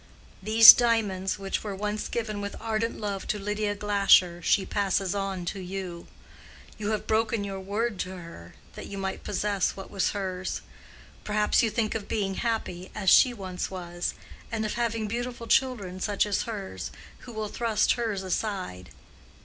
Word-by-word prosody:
These 220 +3 +11
diamonds, 210 -6 +1
which 195 -1 -3
were 205 -2 -4
once 210 +2 -3
given 215 -3 -3
with 200 0 -5
ardent 225 0 -2
love 200 -2 -4
to 210 - 0
Lydia 210 +1 -2
Glasher, 200 -4 +4
she 190 +3 +2
passes 195 -2 0
on 195 -3 -3
to 195 - -4
you. 180 -2 -6 0.7
You 210 0 -2
have 215 -1 -1
broken 220 -1 +1
your 195 -1 -5
word 205 +2 -2
to 185 +1 -3
her, 165 - -11 0.2
that - - -8
you 200 - -7
might 190 -1 -4
possess 200 -1 0
what 195 - -9
was 195 - +1
hers. 185 -2 -3 0.6
Perhaps 210 0 +2
you 230 - +2
think 215 -1 -1
of 220 -3 -4
being 195 -3 -1
happy, 190 -5 -3
as 195 -3 +2
she 255 - +7
once 190 -6 -5
was, 175 -2 -4 0.4
and 220 -1 -1
of 210 - -2
having 230 -2 -1
beautiful 240 +2 -4
children 225 -8 +1
such 205 +2 +1
as 205 -1 0
hers, 200 -4 -5 0.3
who 245 - -11
will 215 -1 -3
thrust 225 0 +1
hers 220 -5 -1
aside. 185 - -3
205 Hz, 165 wpm, -27 LUFS, 190-220 Hz, 0.7 s, These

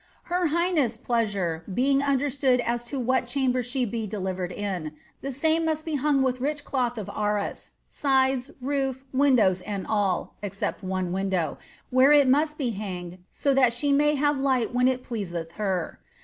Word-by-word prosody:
" - - -36
Her 360 -1 +2
highness' 315 -7 +1
pleasure 200 -9 -1
beiii(f 275 +6 +2
un 280 -1 +2
(ieratuud 265 -3 +1
an 235 +1 +1
to 240 +3 -5
wliat 260 +1 +1
chwnbet 255 -2 +1
she 250 +1 -1
be 225 0 -3
delivered 185 -3 -3
in, 180 -6 -4 0.3
the 275 - -4
same 315 +5 +1
must 315 -1 -1
be 320 -2 -2
huiq; 280 -1 +2
with 255 -1 0
rich 290 +1 -2
cloth 245 -3 -1
of 210 - -5
arms, 210 -1 -2 0.2
sides, 265 -2 +1
roof, 270 -1 -2
windows 250 -9 +4
and 200 -1 -4
all, 200 -4 0
except 200 0 -3
one 185 -1 -2
window, 185 -4 -1 0.3
where 260 +3 +6
it 290 -2 +6
roust 300 +3 +2
be 255 -5 -1
hanged 185 -4 -6
so 280 - 0
that 255 -3 +4
she 285 +4 0
may 295 +1 +3
have 290 0 +1
light 260 -3 +1
when 250 +1 +3
it 255 -1 0
pleaseih 175 -8 -4
!iei. 190 -5 -1
250 Hz, 175 wpm, -26 LUFS, 200-275 Hz, 0.3 s, where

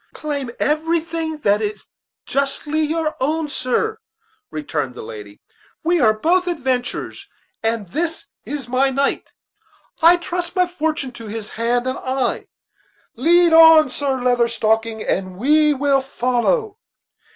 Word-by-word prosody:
"Claim 285 -4 -4
anything 320 +1 -1
that 205 -2 +2
is 210 0 -4 0.4
justly 280 +3 -1
your 310 0 -1
own, 310 +4 0
sir," 435 - -1 0.5
returned 150 - -4
the - - -8
lady; 105 -1 -10 0.4
"we 340 0 +2
are 220 - +5
both 345 +12 +1
adventurers; 265 +4 -3 0.3
and 225 -3 -1
this 325 - -3 0.2
is 285 -5 -6
my 260 +2 +2
knight. 275 +1 -1 0.7
I 340 +2 +7
trust 350 0 -4
my 365 -1 +3
fortune 315 -5 -3
to 230 -2 -10
his 210 0 -6
hand 240 +2 -1
and 260 0 -2
eye. 260 -1 -2 0.7
Lead 340 +6 +4
on, 320 -3 +8
Sir 270 -2 -1
Leather 245 -1 +2
Stocking, 225 -1 0
and 185 -1 -2
we 300 +6 +4
will 275 0 +2
follow." 270 - -1
275 Hz, 130 wpm, -20 LUFS, 235-325 Hz, 0.7 s, on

